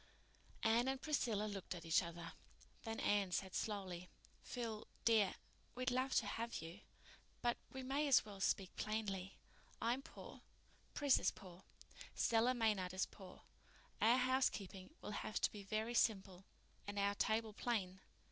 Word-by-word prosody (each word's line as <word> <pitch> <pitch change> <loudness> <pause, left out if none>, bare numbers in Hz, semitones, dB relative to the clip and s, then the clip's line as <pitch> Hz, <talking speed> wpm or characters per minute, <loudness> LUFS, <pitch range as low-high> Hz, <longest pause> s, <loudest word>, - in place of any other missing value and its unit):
Anne 230 +3 +4
and 265 0 0
Priscilla 245 -8 +1
looked 200 -3 -4
at 170 -1 -8
each 165 +1 +4
other. 170 -1 -6 0.5
Then 225 0 -3
Anne 200 -3 +2
said 190 +1 -1
slowly, 185 -4 -3 0.3
"Phil 225 -3 -4 0.2
dear, 220 -4 +5 0.4
we'd 255 0 0
love 260 +1 +1
to - - +4
have 230 +3 -3
you. 165 +4 -8 0.6
But 240 0 +2
we 265 0 -5
may 280 +3 +1
as 275 - +6
well 205 -2 -9
speak 195 -1 +1
plainly. 200 -3 -2 0.4
I'm 240 +4 +1
poor—Pris 285 -2 -2
is - - +3
poor—Stella 225 +6 -1
Maynard 205 -6 +1
is 185 - +2
poor—our 215 +4 -2
housekeeping 250 -7 +1
will - - -4
have 210 - -2
to - - +2
be 205 - -7
very 215 +4 -1
simple 195 -5 +1 0.4
and 205 0 -4
our 200 0 +3
table 220 +1 +1
plain. 195 -5 -1
215 Hz, 140 wpm, -40 LUFS, 190-240 Hz, 0.6 s, as